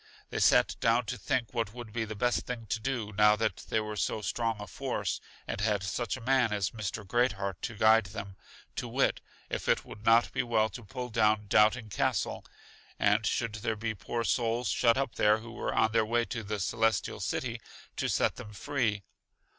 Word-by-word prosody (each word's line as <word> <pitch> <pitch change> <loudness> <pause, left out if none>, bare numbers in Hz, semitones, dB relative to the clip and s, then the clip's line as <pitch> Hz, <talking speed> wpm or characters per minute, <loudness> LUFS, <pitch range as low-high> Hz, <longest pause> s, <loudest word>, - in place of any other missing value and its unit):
They - - -2
sat - - +4
down 115 +1 +3
to 125 - -3
think 125 +2 -1
what 115 -2 -2
would 120 -3 -8
be 115 -1 -1
the 110 0 -6
best 120 +4 0
thing 120 -2 -4
to 115 - 0
do, 115 -3 -3
now 105 +1 +6
that 110 +1 -1
they 110 - +2
were 105 0 -4
so 105 +1 -1
strong 115 +2 -1
a 105 - -5
force, - - -3 0.3
and - - -3
had 105 -2 +1
such 120 +5 -2
a - - -11
man 125 -1 +3
as 100 -3 0
Mr. 110 -1 -4
Great 120 +4 +2
heart 100 -2 -4
to 115 - -4
guide 110 0 +5
them; 100 -1 -7 0.4
to - - -2
wit, - - +1 0.3
if - - -3
it - - +2
would 105 - -11
not 115 +1 +5
be - - +1
well 110 -2 +2
to 115 +4 -9
pull 125 +4 -6
down 110 -2 +2
Doubting 105 +2 +3
Castle, - - 0 0.5
and 105 +1 +3
should 115 +1 -1
there 115 0 -1
be 110 +1 -3
poor 115 +3 -3
souls 115 -1 0
shut 115 +7 +3
up 135 -3 -1
there 105 +1 +5
who 115 +1 -10
were 120 - -3
on 110 0 +2
their 115 0 +3
way 120 +2 +1
to 115 - -4
The 105 0 -4
Celestial 110 +1 0
City, 115 -2 -3 0.4
to - - 0
set - - +1
them 105 - -9
free. 105 -3 -1
110 Hz, 210 wpm, -30 LUFS, 105-120 Hz, 0.5 s, now